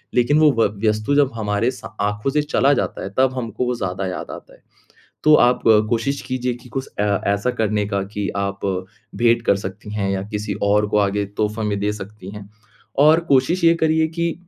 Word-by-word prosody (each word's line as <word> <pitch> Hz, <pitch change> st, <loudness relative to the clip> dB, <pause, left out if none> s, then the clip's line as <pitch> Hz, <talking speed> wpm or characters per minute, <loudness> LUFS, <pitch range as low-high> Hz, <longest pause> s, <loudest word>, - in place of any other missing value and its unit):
लेकिन 125 Hz, +5 st, +3 dB
वो 155 Hz, -1 st, +6 dB
व -, -, +5 dB, 0.2 s
वस्तु 110 Hz, +6 st, 0 dB
जब 140 Hz, -2 st, +3 dB
हमारे 105 Hz, +2 st, 0 dB
सा 105 Hz, -5 st, -11 dB
आँखों 105 Hz, +5 st, -3 dB
से 150 Hz, +2 st, +2 dB
चला 145 Hz, -1 st, +2 dB
जाता -, -, -2 dB
है -, -, -4 dB
तब 130 Hz, 0 st, +3 dB
हमको 120 Hz, 0 st, -3 dB
वो 125 Hz, 0 st, -1 dB
ज़्यादा 95 Hz, -3 st, -3 dB
याद 90 Hz, -2 st, -5 dB
आता -, -, -11 dB
है। -, -, -21 dB, 0.6 s
तो 155 Hz, 0 st, +7 dB
आप 125 Hz, -2 st, +3 dB, 0.3 s
कोशिश 125 Hz, +4 st, 0 dB
कीजिए 125 Hz, -1 st, -2 dB
कि 125 Hz, +1 st, -14 dB
कुछ 135 Hz, -, -6 dB
ए -, -, +2 dB, 0.3 s
ऐसा 100 Hz, +5 st, 0 dB
करने 105 Hz, -1 st, 0 dB
का 100 Hz, -1 st, -1 dB
कि 105 Hz, -1 st, -1 dB
आप 100 Hz, 0 st, -3 dB, 0.5 s
भेंट 120 Hz, 0 st, +3 dB
कर -, -, +4 dB
सकती 100 Hz, +1 st, -7 dB
हैं 100 Hz, -2 st, -1 dB
या 95 Hz, -1 st, -1 dB
किसी 105 Hz, -1 st, -3 dB
और 105 Hz, +1 st, +3 dB
को 105 Hz, -, +1 dB
आगे 100 Hz, 0 st, +1 dB
तोहफ़ा 105 Hz, +1 st, -1 dB
में 105 Hz, -1 st, -1 dB
दे 105 Hz, +1 st, 0 dB
सकती 105 Hz, -1 st, -9 dB
है। 105 Hz, -1 st, -10 dB, 0.5 s
और 155 Hz, +3 st, +6 dB
कोशिश 150 Hz, +7 st, +2 dB
ये 165 Hz, 0 st, +6 dB
करिए 160 Hz, 0 st, +3 dB
कि 170 Hz, +1 st, -2 dB
110 Hz, 205 wpm, -20 LUFS, 100-135 Hz, 0.6 s, तो